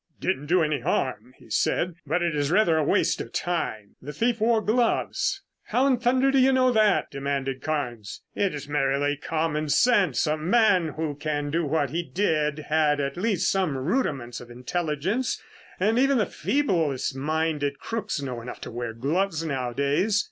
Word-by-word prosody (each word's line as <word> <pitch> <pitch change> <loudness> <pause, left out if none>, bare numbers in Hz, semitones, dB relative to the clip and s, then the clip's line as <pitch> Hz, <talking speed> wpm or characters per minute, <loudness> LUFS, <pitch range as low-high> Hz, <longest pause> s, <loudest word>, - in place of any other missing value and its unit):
"It - - -33
didn't 145 -6 -1
do 175 +1 +3
any 150 -2 0
harm," 130 - -2
he - - -18
said, 180 0 +1
"but 175 - +1
it 170 -3 0
is 145 -1 0
rather 175 -2 +3
a 155 - +2
waste - - +1
of 115 - -8
time. 110 - -3
The 145 - -7
thief 230 - 0
wore 225 0 +4
gloves." 230 +2 0 0.2
"How 255 - +1
in 260 -3 +3
thunder 255 +2 +3
do 270 - +3
you 260 +1 +5
know 255 -1 +4
that?" 215 -3 +2
demanded 135 -1 -3
Carnes. 125 -9 -4
"It's 150 -9 -2
merely 145 0 +1
common 155 0 -2
sense. 205 - +3
A 155 0 0
man 180 -2 +3
who 155 -2 -2
can 145 0 -3
do 165 +1 0
what 145 -3 0
he 170 +3 -1
did 160 -5 0
had 150 -1 +2
at 140 -1 -2
least 200 +1 +1
some 185 -8 0
rudiments 135 - -2
of 120 - -12
intelligence, 165 - -2 0.4
and 220 +5 +2
even 275 +1 +3
the 215 - +2
feeblest 165 - 0
minded 150 0 -1
crooks 220 -7 -3
know 130 -4 -5
enough 120 - -8
to - - -7
wear 120 -1 -4
gloves 160 +7 -1
nowadays." 140 - 0
155 Hz, 175 wpm, -25 LUFS, 140-200 Hz, 0.4 s, you